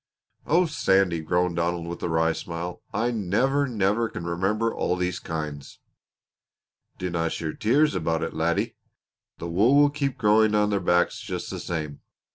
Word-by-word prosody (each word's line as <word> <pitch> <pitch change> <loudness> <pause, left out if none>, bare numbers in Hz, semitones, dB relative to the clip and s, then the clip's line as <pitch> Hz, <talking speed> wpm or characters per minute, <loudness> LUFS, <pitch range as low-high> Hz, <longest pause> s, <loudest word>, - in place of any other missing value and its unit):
"Oh, 175 +4 +4
Sandy," 95 - +2
groaned 90 +2 0
Donald 85 0 -1
with 85 +1 -6
a - - -2
wry 80 0 +2
smile, 85 +2 -6
"I 120 +2 0
never, 125 +7 +1
never 110 0 +1
can 85 - -7
remember 100 +7 0
all 90 - 0
these 90 0 -2
kinds." 75 -3 -6 1.2
"Dinna 85 -2 -1
shed 80 -2 -5
tears 145 +8 +3
about 80 -2 -1
it, - - -3
laddie. - - -1 0.6
The 85 - -6
wool 105 +11 +3
will 145 0 +5
keep 140 -2 -2
growing 105 0 +4
on 105 0 +2
their 100 - +1
backs 90 -1 +2
just - - -5
the - - -5
same. 75 -4 -4
90 Hz, 160 wpm, -25 LUFS, 85-110 Hz, 1.2 s, will